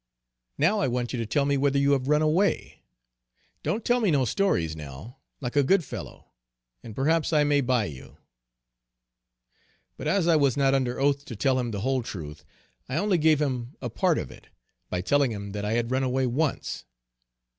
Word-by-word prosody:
"Now 180 +9 +2
I 135 - +1
want 125 0 -2
you 125 - -2
to 115 - -3
tell 140 +4 +1
me 140 0 +1
whether 140 0 +2
you 140 0 +3
have 135 -2 +1
run 150 +1 +3
away? 170 +7 0 0.8
Don't 220 +1 -2
tell 245 0 +3
me 210 - +2
no 140 -5 +2
stories 85 - 0
now, 75 - -10 0.2
like 125 0 -4
a 145 - +5
good 175 +6 +3
fellow, - - -9 0.5
and 110 - -10
perhaps 160 +4 +1
I 150 -2 +4
may 145 -1 +3
buy 125 -4 +1
you." 70 -8 -10 1.8
But - - -5
as 190 -4 +2
I 165 -2 +5
was 140 -4 +2
not 135 -1 +3
under 130 -2 0
oath 140 0 +1
to 115 - -7
tell 130 +4 +1
him 120 -1 -2
the 100 -3 -4
whole 130 +2 0
truth, 80 -9 -8 0.5
I 135 - -2
only 190 0 +2
gave 155 -1 +4
him 130 -3 -2
a 125 -3 -5
part - - +1
of - - -4
it, - - -15 0.4
by 90 - -2
telling 140 +5 +2
him 100 -2 -6
that 105 +1 -4
I 105 - -1
had 120 +1 -1
run 130 +1 +1
away 130 0 0
once. 140 +5 -2
135 Hz, 200 wpm, -26 LUFS, 120-150 Hz, 1.8 s, a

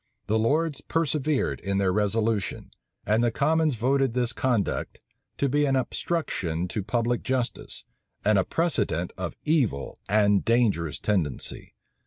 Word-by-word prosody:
The 110 +2 +1
lords 150 +6 +1
persevered 155 -3 0
in 100 0 -2
their 95 -2 +2
resolution; 105 0 0 0.3
and 110 +3 +2
the 120 - +3
commons 155 +4 +2
voted 130 +1 +1
this 120 -1 +1
conduct 120 -6 -1 0.4
to 140 - +1
be 145 +2 +2
an 135 -1 +2
obstruction 95 - -1
to 105 - -2
public 115 +4 0
justice, 130 -2 -3 0.4
and 105 -1 +4
a - - +3
precedent 90 - 0
of 90 -2 -5
evil 130 - 0
and 105 -1 +3
dangerous 105 - +1
tendency. 90 -10 -2
115 Hz, 135 wpm, -26 LUFS, 100-140 Hz, 0.4 s, and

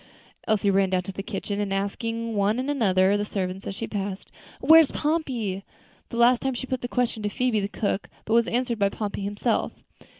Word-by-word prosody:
Elsie 210 -2 +2
ran 195 0 +3
down 185 -1 +1
to 195 - -6
the 195 - -5
kitchen, 205 -1 -3
asking 225 +4 -2
of 225 - -4
one 205 +2 +2
and 260 +3 -1
another 190 -8 +3
of 205 - +2
the - - 0
servants 190 -2 -4
as 195 - -4
she 225 - -4
passed, 200 -2 -5 0.3
"Where's 320 +2 +7
Pompey?" 255 - -1 0.5
The 235 - -5
last 240 +1 +5
time 265 -1 -1
she 260 - -4
put 260 -1 -3
the 245 - -3
question 245 -3 -1
to 210 - -1
Phoebe, 240 +1 +1
the 200 - -1
cook, 205 -1 -2 0.2
but 220 - -1
was 235 0 +4
answered 240 -1 -1
by 200 0 +3
Pompey 205 -1 -4
himself. 205 +3 -1
210 Hz, 210 wpm, -25 LUFS, 195-245 Hz, 0.5 s, Where's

